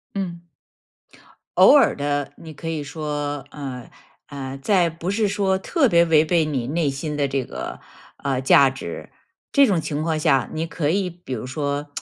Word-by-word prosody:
嗯。 175 -3 -4 1.1
偶 - - +8
尔 - - +5
地， 145 0 -1
你 160 -1 -10
可 165 +2 -6
以 160 -2 -2
说， 145 -1 -4
呃， 130 -4 -7 0.4
呃， 135 -1 -6
在 175 +4 +2
不 165 +3 -4
是 210 +1 +1
说 195 -1 +1
特 280 - +2
别 170 -3 +5
违 160 -2 +5
背 160 0 +2
你 135 -6 -2
内 155 +1 0
心 150 +2 -4
的 145 -1 +1
这 135 -1 -1
个， - - -7 0.4
呃， 135 -2 -2
价 135 +1 +6
值， 130 - -7 0.4
这 280 -1 +5
种 190 -5 +2
情 150 -1 -3
况 160 0 0
下， 145 -5 +2
你 160 +1 -2
可 160 -2 -2
以 190 +2 +1
比 175 -6 -8
如 120 -1 -4
说 145 +2 -3
150 Hz, 190 characters per minute, -22 LUFS, 140-170 Hz, 1.1 s, 偶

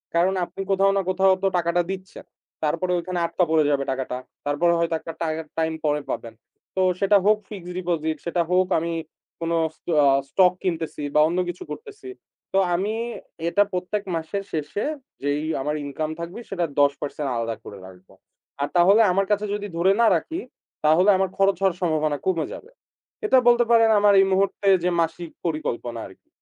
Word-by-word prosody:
কারণ 180 +3 +3
আপনি 195 - -8
কোথাও 195 +1 +4
না - - +2
কোথাও 190 0 +4
তো - - +4
টাকাটা 170 +1 +1
দিচ্ছেন। 190 -1 -8 0.4
তারপরে 165 +4 0
ওখানে 180 0 -3
আটকা 180 +2 0
পড়ে 155 -1 +4
যাবে 140 -1 +1
টাকাটা। 130 -1 -3 0.3
তারপরে 170 +4 +2
হয়তো 170 -1 0
একটা 165 - -8
টাই 160 -1 0 0.3
টাইম 160 0 0
পরে 150 0 +1
পাবেন। 115 -1 -4 0.4
তো 190 - +1 0.2
সেটা 200 +1 +5
হোক 210 +1 +5
ফিক্সড 180 -4 -8
ডিপোজিট, 165 -3 -1
সেটা 170 0 0
হোক 185 0 +3
আমি 170 +1 -3 0.5
কোন 165 0 -2 0.3
স্ট - - -45
অ্যা 145 -1 +5 0.2
স্টক 180 -2 +4
কিনতেছি 160 -4 -3
বা - - +6
অন্য 175 +2 -1
কিছু 175 - -6
করতেছি। 420 -3 -9 0.4
তো 195 - +3 0.2
আমি 200 +5 -1 0.6
এটা 205 +3 +4
প্রত্যেক 185 +3 -2
মাসের 180 +5 -3
শেষে 155 - -2 0.4
যেই 145 +1 0 0.2
আমার 150 +2 -1
ইনকাম 155 +2 -3
থাকবে 170 +6 -6
সেটার 175 -5 -1
১০% 145 0 0
আলাদা 115 -1 -2
করে 100 - -10
রাখবো। 95 0 -16 0.5
আর 145 - +1
তাহলে 195 +6 +6
আমার 195 +2 +2
কাছে 210 +1 +1
যদি 205 0 -3
ধরে 185 +3 +4
না 230 - +6
রাখি 335 +1 -5 0.5
তাহলে 175 +6 +5
আমার 190 -1 +1
খরচ 195 0 +3
হওয়ার 190 -2 +1
সম্ভাবনা 155 -3 +1
কমে 165 -5 +1
যাবে। 460 - -11 0.5
এটা 265 - +5
বলতে 240 0 +6
পারেন 225 -1 +6
আমার 205 0 +5
এই 195 - +6
মুহূর্তে 195 +1 +1 0.2
যে, 180 - +2
মাসিক 165 0 -3 0.2
পরিকল্পনা 120 -7 -3
আরকি। 95 - -19
175 Hz, 175 wpm, -23 LUFS, 155-195 Hz, 0.6 s, বা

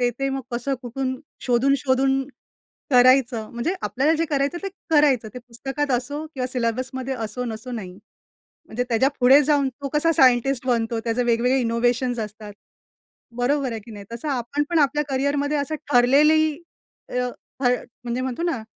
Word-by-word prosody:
ते-ते 245 +2 0
मग 270 0 -3
कसं 245 +3 -1
कुठून 260 +2 -3 0.3
शोधून-शोधून 270 +1 +2 0.7
करायचं," 250 -3 +4
म्हणजे 240 +11 -2
आपल्याला 285 +5 +1
जे 330 - +1
करायचं 285 +2 0
ते 390 - -2 0.2
करायचं. 285 -7 +3
ते - - -5
पुस्तकात 270 +4 -4
असो 285 +5 -5
किंवा 270 -5 -4
सिलेबस 245 0 -2 0.3
असो 225 +2 -4
नसो 230 +1 -6
नाही. 190 -5 -7 0.7
म्हणजे 245 +3 -3
त्याच्या 240 +3 +3
पुढे 265 +4 +7
जाऊन 285 -1 +2
तो 275 +2 -7
कसा 330 +2 +3
सायंटिस्ट 255 -1 +3
बनतो, 230 -2 0
त्याचे 230 +2 -1
वेगवेगळे 245 +3 +2
इनोव्हेशन्स 240 +1 0
असतात. 210 -1 -7 0.8
बरोबर 270 +2 0
आहे 225 - -5
की 215 - -14
नाही? 205 -1 -9
तसं 235 +6 -5
आपण 270 +2 -1
पण 340 - +2
आपल्या 295 +1 +2
करिअरमध्ये 285 +2 0
असं 285 +2 -2 0.2
ठरलेली 280 +6 +5 0.7
अ, 250 0 -1 0.3
ठ - - -3 0.4
म्हणजे 240 +1 -2
म्हणतो 260 +4 -3
ना, 330 -10 -1
255 Hz, 155 wpm, -23 LUFS, 240-280 Hz, 0.8 s, पुढे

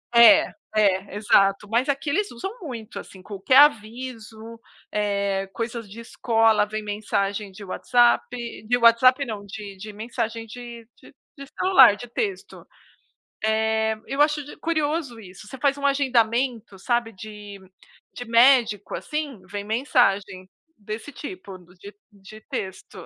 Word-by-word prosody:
É, 235 +6 +7 0.2
é, 200 -1 +1
exato. 200 -1 +2
Mas 245 +5 +1
aqui 280 +1 -1
eles 410 +7 -1
usam 245 +12 -6
muito, 235 -9 -7
assim, 190 - -12
qualquer 205 +7 +1
aviso, 230 -3 +1 0.3
eh, 200 -2 -1
coisas 230 -2 -5
de 220 +3 -11
escola 225 -2 +2
vem 215 0 -5
mensagem 205 -1 -2
de 200 +2 -12
WhatsApp. 240 +5 +2 0.4
De 245 +1 +2
WhatsApp 255 +4 +5
não, 210 -3 -6
de 200 -1 -9
de 210 +2 -9
mensagem 225 +1 -4
de 235 0 -10
de - - -17 0.2
de 275 - -9
celular, 265 - +6
de 245 +4 -10
texto. 390 - -5 1.2
Eh, 220 0 0
eu 275 +2 -1
acho 295 -1 +2
di 290 - -12
curioso 310 -6 -2
isso. 195 +1 -13
Você 265 - -9
faz 280 +1 +1
um 280 - -4
agendamento, 240 -5 0
sabe, 235 0 -1
de 205 0 -10 0.5
de 245 - -8
médico, 230 -3 +3
assim, 300 -7 -5
vem 200 +1 -6
mensagem 205 -5 0 0.3
desse 215 +6 -7
tipo 190 -7 -9 0.2
de 205 +2 -11 0.2
de 205 +2 -15
texto. 190 -1 -7
225 Hz, 140 wpm, -23 LUFS, 205-255 Hz, 1.2 s, É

